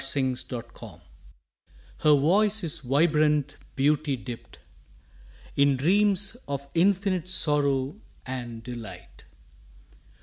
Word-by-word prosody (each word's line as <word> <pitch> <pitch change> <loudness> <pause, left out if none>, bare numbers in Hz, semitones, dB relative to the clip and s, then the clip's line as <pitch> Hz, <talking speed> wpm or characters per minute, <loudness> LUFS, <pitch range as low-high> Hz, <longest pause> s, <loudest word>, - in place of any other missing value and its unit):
SONG 135 -1 0 1.6
Her 150 -1 +5
voice 200 +8 +3
is 165 - 0
vibrant 150 +1 +2 0.2
beauty 145 0 +1
dipt 120 -1 -9 1.0
In 140 -1 +3
dreams 195 - +2
of 140 -1 -4
infinite 185 0 +1
sorrow 145 -1 +1 0.2
and 120 -3 -6
delight. 120 -2 -10
145 Hz, 80 wpm, -26 LUFS, 135-180 Hz, 1.6 s, Her